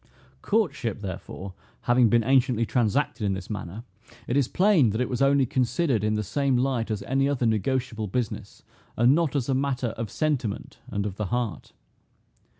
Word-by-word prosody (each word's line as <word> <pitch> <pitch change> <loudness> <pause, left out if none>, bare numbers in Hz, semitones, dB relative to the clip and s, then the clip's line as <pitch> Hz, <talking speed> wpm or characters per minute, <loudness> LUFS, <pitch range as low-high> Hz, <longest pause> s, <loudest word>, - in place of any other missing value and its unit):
Courtship, 150 - 0
therefore, 95 0 -7 0.3
having 120 -1 +4
been 115 0 +3
anciently 125 -2 +3
transacted 120 +1 0
in 100 -2 +1
this 95 +3 -7
manner, 105 +1 -6 0.4
it 120 - -2
is 140 -3 +3
plain, 180 - +4
that 110 +2 -2
it 125 - +1
was 125 0 -2
only 140 0 +4
considered 125 - 0
in 105 0 +1
the 105 - -1
same 135 +5 0
light 125 -3 0
as 105 -2 -2
any 135 +1 +1
other 130 -4 0
negotiable 115 +1 0
business, 115 +2 -4 0.3
and 120 +3 +5
not 160 -2 +1
as 130 -4 0
a 135 - +1
matter 130 -2 0
of 115 -2 -3
sentiment, 130 -6 -2
and 100 0 -3
of 100 -2 -4
the 105 - -2
heart. 115 -5 -3
120 Hz, 175 wpm, -26 LUFS, 110-135 Hz, 0.4 s, and